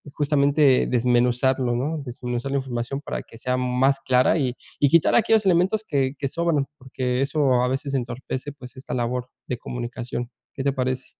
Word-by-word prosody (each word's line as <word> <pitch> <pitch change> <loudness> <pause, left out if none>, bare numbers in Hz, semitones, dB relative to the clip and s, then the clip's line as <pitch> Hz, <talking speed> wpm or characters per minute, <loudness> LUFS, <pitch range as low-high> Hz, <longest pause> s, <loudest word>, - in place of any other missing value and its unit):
justamente 145 -2 +3
desmenuzarlo, 125 +1 +2
¿no? 150 +5 -2
Desmenuzar 125 +1 -4
la 140 - +1
información 130 +1 -4
para - - -4
que 115 - -15
sea 125 +2 -1
más 125 +2 +2
clara 130 +4 +3
y 130 -5 0 0.3
y 145 - +5
quitar 165 +2 +4
aquellos 220 -2 +4
elementos 190 +4 +3
que 135 -2 0
que 140 - -1
sobran, 165 -3 0
porque 130 -1 -2
eso 135 -3 +2
a 125 - +1
veces 135 +2 -3
entorpece, 130 +2 -4
pues, 130 -3 -12
esta 130 - -7
labor 125 +1 -2 0.2
de 125 - -2
comunicación. 120 0 -5 0.2
¿Qué 135 - -4
te 140 0 +1
parece? 130 -1 -2
130 Hz, 170 wpm, -24 LUFS, 125-140 Hz, 0.3 s, y